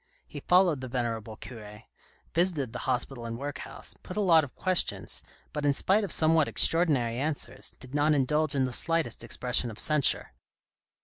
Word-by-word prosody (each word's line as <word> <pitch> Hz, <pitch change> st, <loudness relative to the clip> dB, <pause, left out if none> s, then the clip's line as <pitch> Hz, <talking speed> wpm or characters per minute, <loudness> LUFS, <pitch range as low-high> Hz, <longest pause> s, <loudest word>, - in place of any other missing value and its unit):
He -, -, -9 dB
followed 180 Hz, -6 st, +3 dB
the 130 Hz, -, -5 dB
venerable 115 Hz, -3 st, -3 dB
cure, 105 Hz, -2 st, -11 dB, 0.5 s
visited 160 Hz, -7 st, 0 dB
the -, -, -5 dB
hospital 125 Hz, -1 st, -2 dB
and 115 Hz, 0 st, -5 dB
workhouse, 140 Hz, +1 st, -6 dB
put 180 Hz, -, -8 dB
a -, -, +1 dB
lot 170 Hz, -6 st, +5 dB
of 135 Hz, -, -9 dB
questions, 185 Hz, -1 st, 0 dB, 0.3 s
but 150 Hz, -, -4 dB
in 145 Hz, -1 st, +3 dB
spite 200 Hz, +9 st, +2 dB
of 195 Hz, -, -4 dB
somewhat 160 Hz, -1 st, +4 dB
extraordinary 140 Hz, -9 st, +2 dB
answers, 140 Hz, -3 st, -4 dB
did 130 Hz, 0 st, -13 dB
not 150 Hz, +1 st, +2 dB
indulge 150 Hz, +2 st, +1 dB
in 135 Hz, -1 st, +2 dB
the 130 Hz, -, -4 dB
slightest 165 Hz, +4 st, -1 dB
expression 125 Hz, -1 st, 0 dB
of 110 Hz, -, -9 dB
censure. 150 Hz, -, +4 dB
140 Hz, 170 wpm, -28 LUFS, 125-160 Hz, 0.5 s, lot